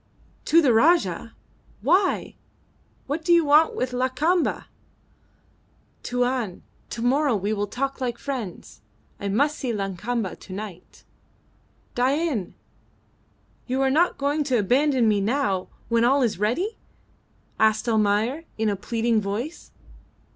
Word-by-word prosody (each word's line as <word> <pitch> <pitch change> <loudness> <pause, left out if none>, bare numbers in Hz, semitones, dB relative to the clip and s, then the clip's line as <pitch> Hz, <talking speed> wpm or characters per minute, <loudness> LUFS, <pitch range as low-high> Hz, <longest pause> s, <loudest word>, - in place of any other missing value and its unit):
"To 335 +1 +5
the 255 -5 +4
Rajah! 325 +10 +2 0.5
Why? 380 0 +2 0.7
What 300 +4 -3
do 345 - +1
you 340 -2 +5
want 300 +2 +5
with 255 0 -2
Lakamba?" 260 +8 0 1.4
"Tuan, 245 -5 -2 0.3
to 230 - -5
morrow 270 +1 +2
we 205 +2 -1
talk 270 +5 -3
like 240 -2 -2
friends. 240 - -6 0.4
I 200 - -4
must 285 +10 +1
see 255 -4 -2
Lakamba 205 +1 -3
to 185 - -10
night." 190 -3 -9 0.9
"Dain, 265 - 0 1.1
you 260 +1 -1
are 265 - +2
not 335 +6 +2
going 290 +2 0
to 260 -4 +1
abandon 255 +3 +2
me 210 -2 +2
now, 205 -4 0 0.2
when 230 0 +2
all 265 +3 +4
is 220 -6 -1
ready?" 320 - -1 0.8
asked 220 +2 +2
Almayer, 220 +7 +1
in 220 -1 +1
a 205 - 0
pleading 225 +2 0
voice. 220 +11 -5
245 Hz, 125 wpm, -24 LUFS, 215-285 Hz, 1.4 s, To